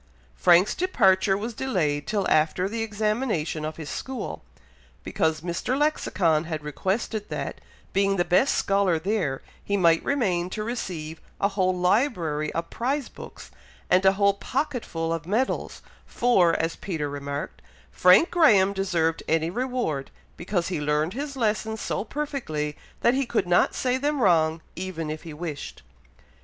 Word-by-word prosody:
Frank's 175 - +5
departure 195 - +3
was 225 +4 -4
delayed 170 - -1
till 205 -3 0
after 155 +4 +2
the 225 +3 -3
examination 210 -7 -1
of 155 0 -4
his 155 -3 -7
school, 265 -1 -5 0.6
because 160 -1 0
Mr. 175 +10 -2
Lexicon 175 - +1
had 155 -2 -4
requested 200 - -2
that, - - -5 0.3
being 195 0 +2
the 175 -2 +1
best 190 +10 +3
scholar 195 -3 +2
there, 170 -6 -1 0.2
he 200 - 0
might 165 -3 +4
remain 185 -11 0
to 215 +3 -4
receive 170 -9 -5 0.2
a 200 - +2
whole 185 -2 0
library 180 - +1
of 165 0 -4
prize 270 +3 -2
books, - - -11 0.4
and 185 +1 +5
a 190 0 +5
whole 200 0 +3
pocketful 220 - -2
of 165 -1 -5
medals; 230 +7 -1 0.2
for, 190 -9 +3
as 165 0 -1
Peter 160 -6 -3
remarked, 140 0 -5 0.3
"Frank 185 - +5
Graham 210 - +5
deserved 170 -4 0
any 160 +1 +1
reward, 240 - -2 0.3
because 175 -1 -2
he 175 -5 -2
learned 150 +3 0
his 275 +2 -5
lessons 220 -1 -1
so - - -2
perfectly, 215 - -3 0.3
that 235 - +4
he 270 -1 0
could 225 -5 0
not 175 0 +3
say 255 0 0
them 290 +2 -1
wrong 160 -6 +3
even 170 -4 -4
if 155 - -6
he 165 -3 -9
wished!" 155 -3 -6
185 Hz, 150 wpm, -25 LUFS, 160-225 Hz, 0.6 s, Frank's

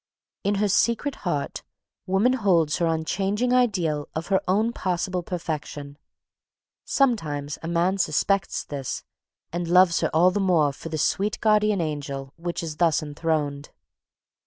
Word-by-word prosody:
In 200 +1 +1
her 205 +1 +1
secret 235 +7 +1 0.2
heart, 145 -4 -2 0.5
woman 195 +7 +3
holds 180 - +2
her 170 - +1
unchanging 195 +9 0
ideal 180 -12 +1
of 160 +3 -4
her 190 -1 +3
own 215 +5 +2
possible 180 -1 -1
perfection. 155 -4 -5 0.9
Sometimes 155 - 0
a 165 - -6
man 175 +3 +1
suspects 190 +4 +1
this, 140 -3 -5 0.5
and 175 0 -2
loves 180 0 +5
her 160 - +1
all 175 +3 +4
the 205 - -1
more 170 -7 +3
for 165 - -8
the 160 - -3
sweet 200 +7 0
guardian 210 -3 +3
angel 140 -3 -4
which 170 0 -4
is 155 -2 -5
thus 165 -3 +2
enthroned. 150 -1 -2
175 Hz, 140 wpm, -25 LUFS, 155-195 Hz, 0.9 s, loves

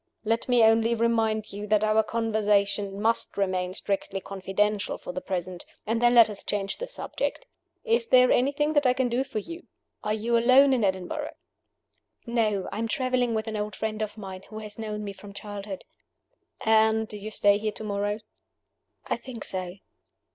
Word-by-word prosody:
Let 230 +3 0
me 245 -2 +5
only 225 +1 +4
remind 225 -2 +1
you 205 +1 -5
that 210 0 +3
our 215 0 +4
conversation 205 -3 0
must 225 +2 0
remain 185 -2 -1
strictly 195 -1 -2
confidential 195 +2 -1
for - - -7
the 185 - -4
present; 180 -1 -4 0.2
and 225 +2 0
then 240 0 +5
let 230 -2 +9
us 210 -2 -7
change 200 -1 -2
the - - -5
subject. - - -4 0.4
Is 465 0 +1
there 255 - +6
anything 285 +4 +2
that 290 -3 +3
I 250 - +4
can 255 -1 0
do 245 +3 +1
for 270 - -7
you? 335 - -6 0.4
Are 210 0 0
you 230 +2 0
alone 255 +4 +6
in 245 -4 +1
Edinburgh?" 190 -2 -2 0.9
"No. 220 -5 0
I 205 - -4
am 230 - -1
traveling 250 -1 0
with 220 0 -2
an 220 - -3
old 210 -1 -3
friend 220 0 -3
of 215 0 -4
mine, 190 -3 -7
who 215 - -8
has 215 0 -8
known 210 -1 -4
me 200 -1 -5
from 200 +1 -12
childhood." 200 -1 -7 0.8
"And 220 0 +3
do 210 - -8
you 210 +1 -6
stay 205 -1 +3
here 215 0 -1
to 220 - -8
morrow?" 205 0 -2 0.8
"I - - 0
think 235 -2 -8
so." 185 -1 -2
215 Hz, 185 wpm, -27 LUFS, 200-235 Hz, 0.9 s, let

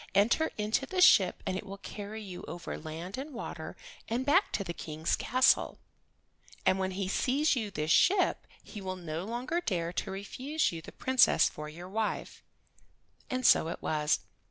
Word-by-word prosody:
Enter 235 +11 +3
into 215 +5 0
the 375 - -3
ship 195 - +6
and 185 - -1
it 190 - -4
will 200 -1 -8
carry 210 +2 -7
you 185 -3 -8
over 175 - -6
land 165 +8 -6
and 280 0 -7
water, - - -6 0.3
and 240 +3 -1
back 370 +8 +3
to 200 - 0
the 170 - -5
King's 155 0 -2
castle. 255 +3 +3 0.9
And 190 - +3
when 190 0 0
he 195 -2 -1
sees 275 +9 +2
this 200 - -2
ship 370 - +3 0.2
he 210 - -9
will 185 -1 -4
no 170 -1 -5
longer 250 - -2
dare 175 - -2
to 195 - -3
refuse 255 +11 -2
you 165 -1 -6
the - - -11
Princess 260 -1 +4
for 150 0 -7
your 170 +4 -9
wife." 215 +3 -3 0.9
And 255 -1 -2
so - - +6
it 165 - -4
was. 150 -1 +1
200 Hz, 175 wpm, -30 LUFS, 175-255 Hz, 0.9 s, ship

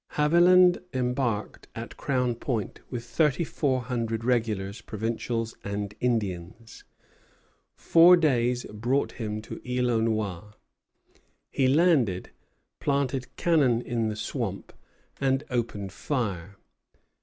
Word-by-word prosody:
Haviland 175 +4 +5
embarked 125 -4 -2
at - - -7
Crown 125 -3 0
Point 115 -3 -3
with 120 -2 -5
thirty 150 +5 +1
four 135 -5 0
hundred 115 -2 -3
regulars, 110 -5 -1
provincials, 115 +1 -3
and 100 0 -4
Indians. 110 -2 -3 0.9
Four 175 +2 +6
days 125 -6 +1
brought 120 +6 0
him 110 -2 -5
to - - -8
Isle 125 -1 0
aux 115 -1 +2
Noix; 105 -3 -2 1.0
he 130 - +2
landed, 135 - +2 0.5
planted 135 -3 -1
cannon 145 -9 +3
in 115 -2 -1
the 105 - -4
swamp, 105 - -4 0.5
and 135 0 +1
opened 110 -5 -2
fire. 100 - -3
120 Hz, 110 wpm, -27 LUFS, 110-135 Hz, 1.0 s, Four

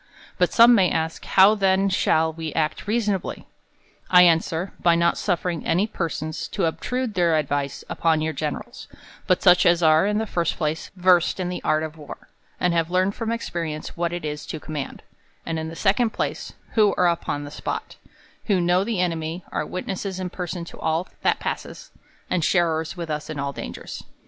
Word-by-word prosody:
But - - +3
some 235 +1 +7
may 190 -6 +4
ask, 160 0 -2
How 195 +2 +6
then 195 -1 +2
shall 160 -4 +2
we 160 -1 -5
act 155 +3 -1
reasonably? 210 -4 -1 0.6
I 180 -1 +8
answer, 165 +1 +2
;by 170 -1 +4
not 170 0 +3
sufiering 175 -3 -1
any 180 +5 +2
persons 160 -6 -4
to - - -1
obtrude 250 +8 -2
their 170 -4 +3
advice 145 -2 -2
upon 160 -2 +1
your 160 0 -1
generals, 155 - -5 0.4
but 185 -3 +2
such 180 -2 +6
as 175 0 +4
are, 160 +4 +5
in 210 0 +1
the 220 - 0
first 175 -5 -1
place, 155 -1 -2
versed 180 -1 +3
in 180 -1 -2
the 180 - -4
art 155 0 +1
of 160 0 -7
war, 150 - -11 0.3
and 180 -1 +2
have 165 -1 +1
learned 185 +2 +1
from 225 +1 -3
experience 165 -9 -4
what 170 0 -1
it 175 -2 -4
is 150 0 -5
to 155 - -5
command; 150 -2 -6 0.4
and 165 -1 -2
in 160 - -4
the 165 - -7
second 215 +6 +2
place, - - -3 0.2
who 210 -3 +4
are 180 - +4
upon 165 -4 -1
the 145 - -8
spot; - - -5 0.5
who 200 -4 +2
know 175 +2 +2
the 220 -2 -2
enemy; 165 -1 -2
are - - -2
witnesses 190 +1 -4
in 180 -1 -4
person 175 -1 -5
to - - -12
all 160 +4 -1
that - - +2
passes; - - -5 0.4
and 175 -3 0
sharers 160 0 +1
with 170 -2 -4
us 150 +1 -4
in 155 - -5
all 140 0 -3
dangers. - - -7
170 Hz, 190 wpm, -23 LUFS, 160-190 Hz, 0.6 s, I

